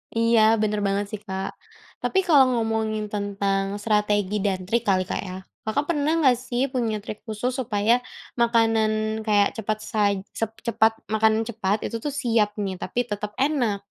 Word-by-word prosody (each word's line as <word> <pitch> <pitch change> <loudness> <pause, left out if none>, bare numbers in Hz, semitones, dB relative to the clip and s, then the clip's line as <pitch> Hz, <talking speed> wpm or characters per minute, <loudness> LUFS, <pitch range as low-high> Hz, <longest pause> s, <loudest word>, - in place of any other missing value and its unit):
Iya 230 0 +4 0.2
bener 210 -1 0
banget 200 +1 0
sih, 215 - -4
Kak. 190 0 -3 0.5
Tapi 385 - +1
kalau 285 -5 +7
ngomongin 220 -2 -1
tentang 200 -1 0 0.2
strategi 210 -2 +1
dan 190 -2 0
trik 235 +2 +1
kali, 185 -1 +3
Kak, - - -3
ya, 185 - -6 0.3
Kakak 280 +7 +1
pernah 295 -1 +1
nggak 250 -3 +5
sih 245 0 -1
punya 235 -4 0
trik 215 - -7
khusus 220 +4 -2
supaya 225 +1 +2 0.4
makanan 220 -2 +2
kayak 205 -1 +4
cepat 215 0 -1
saj 205 -2 +1
sep 225 0 -4
cepet 225 -1 +3 0.2
makanan 220 +1 +3
cepat 215 -3 -2
itu 230 - -3
tuh 295 - -5
siap 225 -4 +1
nih 195 -3 -3
tapi 245 - -1
tetep 210 -2 -5
enak? 250 -8 0
215 Hz, 165 wpm, -24 LUFS, 205-230 Hz, 0.5 s, kalau